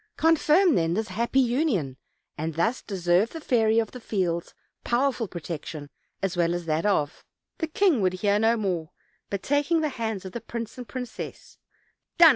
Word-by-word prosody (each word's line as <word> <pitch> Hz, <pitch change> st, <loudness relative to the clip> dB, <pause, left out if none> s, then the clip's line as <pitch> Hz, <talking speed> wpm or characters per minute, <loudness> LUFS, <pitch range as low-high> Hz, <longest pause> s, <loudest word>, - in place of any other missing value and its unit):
Confirm, 325 Hz, +2 st, +4 dB
then, 165 Hz, -3 st, +1 dB
this 220 Hz, +2 st, -1 dB
happy 235 Hz, +4 st, +1 dB
union, 240 Hz, -, +1 dB, 0.4 s
and 160 Hz, 0 st, -3 dB
thus 225 Hz, +10 st, +1 dB
deserve 185 Hz, +1 st, +1 dB
the 325 Hz, -, -5 dB
Fairy 225 Hz, -6 st, +2 dB
of 225 Hz, -2 st, +1 dB
the 250 Hz, -, -8 dB
Fields' 180 Hz, -7 st, -2 dB, 0.3 s
power 260 Hz, +4 st, +2 dB
ful 230 Hz, -4 st, -4 dB
protection, 155 Hz, -3 st, -6 dB, 0.3 s
as 195 Hz, -2 st, 0 dB
well 170 Hz, 0 st, +2 dB
as 175 Hz, -1 st, -4 dB
that 160 Hz, +4 st, 0 dB
of 150 Hz, -8 st, 0 dB, 0.2 s
" -, -, -59 dB
The 325 Hz, -, -1 dB
king 315 Hz, -, +3 dB
would 185 Hz, -1 st, +2 dB
hear 200 Hz, +2 st, +2 dB
no 225 Hz, +2 st, +3 dB
more, 180 Hz, -7 st, -2 dB, 0.4 s
but 200 Hz, -1 st, -3 dB
taking 290 Hz, +4 st, +2 dB
the 305 Hz, -, +1 dB
hands 220 Hz, -7 st, -3 dB
of 190 Hz, -, -6 dB
the 235 Hz, -, -5 dB
prince 230 Hz, -2 st, -6 dB
and 245 Hz, -, -7 dB
princess: 250 Hz, -2 st, -7 dB, 0.6 s
"Done!" 335 Hz, -1 st, +10 dB
220 Hz, 185 wpm, -26 LUFS, 175-255 Hz, 0.6 s, Done